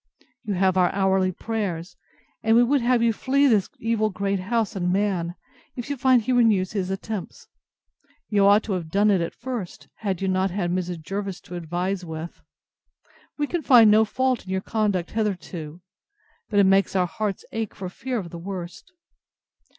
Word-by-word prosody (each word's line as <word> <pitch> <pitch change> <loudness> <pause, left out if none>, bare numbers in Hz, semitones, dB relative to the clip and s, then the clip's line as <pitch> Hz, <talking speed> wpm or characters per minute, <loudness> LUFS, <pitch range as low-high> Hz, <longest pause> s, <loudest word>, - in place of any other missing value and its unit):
You 205 - -1
have 190 0 +2
our 180 -1 +4
hourly 190 -1 +2
prayers; 185 -4 -4 0.5
and 225 +1 +3
we 240 - +6
would 275 +2 +2
have 240 0 +2
you 230 -1 +3
flee 275 +5 +2
this 215 -8 +3
evil 225 -1 0
great 195 0 -1
house 220 +3 -1
and 180 -2 0
man, 185 -3 0 0.4
if 245 +3 -5
you - - -1
find 255 -2 +3
he 255 - -1
renews 220 -7 +3
his 190 -3 -2
attempts. 195 0 -5 0.8
You 200 -2 +3
ought 205 +2 +5
to 210 - -3
have 170 -4 -3
done 205 +4 +3
it 190 -3 +2
at 170 - -4
first, 235 -7 -6
had 195 -5 -2
you 195 - -1
not 185 +1 +1
had 175 -2 -2
Mrs. 175 -2 -3
Jervis 195 +1 -4
to - - -12
advise 175 +3 -3
with. 160 0 -7 1.0
We 295 - 0
can 345 +3 -2
find 235 -7 +7
no 215 +1 +6
fault 255 +2 0
in 185 - -13
your 190 0 -1
conduct 205 -5 -1
hitherto: 180 -6 -4 0.7
But 205 - +2
it 200 - +6
makes 195 +1 +3
our 185 -1 +3
hearts 200 +2 -4
ache 225 -2 -4
for 190 - -6
fear 245 +7 -4
of 180 -6 -5
the 170 - -7
worst. 180 - -7
195 Hz, 185 wpm, -24 LUFS, 180-225 Hz, 1.0 s, find